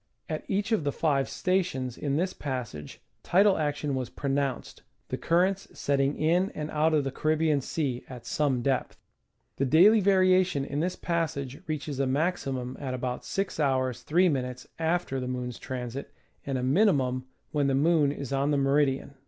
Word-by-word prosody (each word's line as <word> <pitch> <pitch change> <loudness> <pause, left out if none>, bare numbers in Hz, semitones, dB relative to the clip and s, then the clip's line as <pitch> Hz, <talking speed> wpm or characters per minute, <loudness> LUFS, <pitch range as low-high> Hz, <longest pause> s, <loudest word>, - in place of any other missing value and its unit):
At 155 -1 -4
each 205 +3 -1
of 220 -8 +2
the 145 - 0
five 140 -3 +1
sta 185 +1 +1
tions 130 -9 -4
in 140 0 -2
this 180 +5 0
passage 125 - -6 0.2
tidal 195 0 +4
action 145 -1 -1
was 130 -2 -2
pronounced, 140 -2 -2 0.3
the - - -1
currents 185 +3 +1
setting 140 0 +1
in 175 +5 +2
and 150 0 -4
out 155 +1 +2
of 150 - +2
the 135 - -2
Caribbean 155 0 +1
Sea 130 -3 -2
at 125 -2 -9
some 135 -5 0
depth. 135 -1 -1 0.6
The 135 - +1
daily 180 - +6
variation 185 -6 +3
in 145 +1 -3
this 175 +3 -1
passage 145 -6 -2
reaches 145 -3 -3
a 135 - +1
maximum 135 -4 -1
at 130 -3 -3
about 125 0 -3
6'^ 195 0 -2
3"^ 130 0 +1
after 165 -4 0
the 125 - -4
moon's 125 -1 -4
transit, 130 0 -5 0.4
and 135 -1 -1
a 125 - -2
minimum 130 -5 +2 0.3
when 145 -2 +1
the 135 - +2
moon 150 0 +3
is 140 -2 -5
on 135 +1 +1
the 145 - +2
meridian. 140 0 +1
140 Hz, 170 wpm, -28 LUFS, 130-165 Hz, 0.6 s, daily